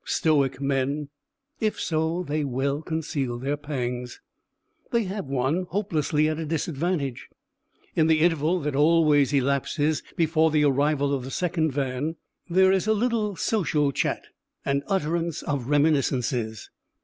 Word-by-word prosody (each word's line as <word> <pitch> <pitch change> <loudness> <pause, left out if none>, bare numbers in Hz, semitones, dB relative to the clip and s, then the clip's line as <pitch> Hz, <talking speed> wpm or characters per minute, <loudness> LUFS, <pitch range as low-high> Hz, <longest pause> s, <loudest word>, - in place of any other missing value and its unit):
Stoic 140 -5 +1
men, 140 +1 -1 0.5
if 215 -1 -1
so, 160 +2 0
they 150 -1 -1
well 140 +2 -1
conceal 150 -6 -3
their 135 +4 -1
pangs. 125 -4 -4 0.7
They 235 -1 +1
have 195 -4 -4
one 140 +7 0
hopelessly 155 -6 0
at 155 0 -2
a 165 - -3
disadvantage. 155 -3 -2 0.7
In 160 -1 +3
the 160 -1 +3
interval 165 +1 +2
that 145 -1 -2
always 150 -2 +4
elapses 140 +2 +1
before 160 -1 +3
the 155 -1 +2
arrival 140 0 +2
of 135 -3 -1
the 130 - -6
second 160 0 0
van, 135 +3 -2 0.3
there 190 +2 +5
is 190 +2 +1
a 220 - +4
little 220 -2 0
social 155 -9 +1
chat - - -1 0.4
and 140 0 +1
utterance 170 -3 -1
of 140 -5 -2
reminiscences. 130 -7 +1
150 Hz, 135 wpm, -25 LUFS, 140-165 Hz, 0.7 s, there